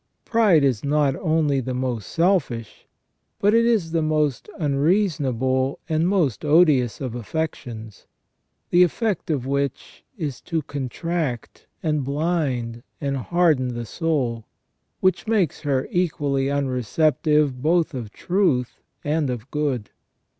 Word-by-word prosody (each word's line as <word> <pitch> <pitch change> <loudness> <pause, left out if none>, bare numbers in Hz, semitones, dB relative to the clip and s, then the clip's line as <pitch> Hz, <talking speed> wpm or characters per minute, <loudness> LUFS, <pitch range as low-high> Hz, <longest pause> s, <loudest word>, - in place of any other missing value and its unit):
Pride 210 -10 +4
is 130 -6 +1
not 145 -1 +2
only 155 -4 +1
the 130 0 -3
most 125 -4 -2
selfish, 165 - 0 0.5
but 205 +1 +3
it 230 0 +4
is 215 -9 +1
the 165 -1 +1
most 155 - 0
unreasonable 140 - +1
and 160 +1 +1
most 170 - +1
odious 150 -6 +4
of 130 -4 -4
affections, 120 -4 -5 0.6
the 175 - +5
effect 195 +1 +1
of 140 -6 -1
which 140 0 -3
is 150 - -4
to 165 -3 -2
contract, 140 0 -4 0.2
and 150 -3 0
blind, 140 -5 -1 0.2
and 140 -1 -1
harden 135 -4 +1
the 120 0 -4
soul, 125 -6 -2 0.5
which 185 +3 +1
makes 205 -9 +1
her 135 -3 0
equally 145 -6 0
unreceptive 140 +1 +1
both 165 +2 +2
of 120 -5 -6
truth 170 - 0 0.2
and 150 -1 0
of 125 +1 -5
good. 140 -8 -2
145 Hz, 125 wpm, -23 LUFS, 130-165 Hz, 0.6 s, the